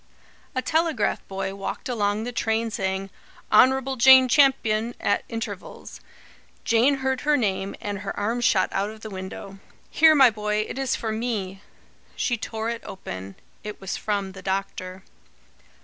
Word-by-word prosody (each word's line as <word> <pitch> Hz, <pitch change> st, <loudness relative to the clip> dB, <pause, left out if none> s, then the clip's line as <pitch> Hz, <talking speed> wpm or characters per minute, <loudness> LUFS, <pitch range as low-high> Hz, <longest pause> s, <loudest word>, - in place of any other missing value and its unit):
A 255 Hz, -, -1 dB
telegraph 320 Hz, -5 st, 0 dB
boy 195 Hz, 0 st, -4 dB
walked 195 Hz, 0 st, -5 dB
along 210 Hz, -3 st, 0 dB
the 245 Hz, -, -4 dB
train, 225 Hz, -1 st, -1 dB
saying: 190 Hz, -1 st, -3 dB, 0.4 s
"Honrubble 265 Hz, +1 st, +4 dB
Jain 260 Hz, +1 st, +8 dB
Champyun" 240 Hz, -4 st, +3 dB
at 205 Hz, -, +1 dB
intervals. 220 Hz, -4 st, -7 dB, 0.6 s
Jane 240 Hz, +5 st, +3 dB
heard 265 Hz, -1 st, 0 dB
her 295 Hz, 0 st, +3 dB
name, 195 Hz, -5 st, -1 dB
and 205 Hz, -1 st, -4 dB
her -, -, -5 dB
arm 230 Hz, +4 st, -1 dB
shot 195 Hz, -5 st, +3 dB
out 200 Hz, +2 st, -1 dB
of 215 Hz, 0 st, -11 dB
the 220 Hz, -, -8 dB
window. 190 Hz, +1 st, -8 dB, 0.3 s
"Here, 315 Hz, 0 st, +6 dB
my 265 Hz, -4 st, +7 dB
boy! 210 Hz, 0 st, -1 dB
It -, -, -6 dB
is 270 Hz, -2 st, 0 dB
for 220 Hz, -, -3 dB
me." 215 Hz, -4 st, -3 dB, 0.5 s
She 240 Hz, -, 0 dB
tore 225 Hz, 0 st, -4 dB
it 235 Hz, -, -5 dB
open. 95 Hz, -, -8 dB, 0.3 s
It 210 Hz, 0 st, -7 dB
was 195 Hz, -1 st, -4 dB
from 200 Hz, -2 st, -2 dB
the 190 Hz, 0 st, -11 dB
doctor. 190 Hz, -1 st, -4 dB
215 Hz, 155 wpm, -24 LUFS, 195-245 Hz, 0.6 s, Jain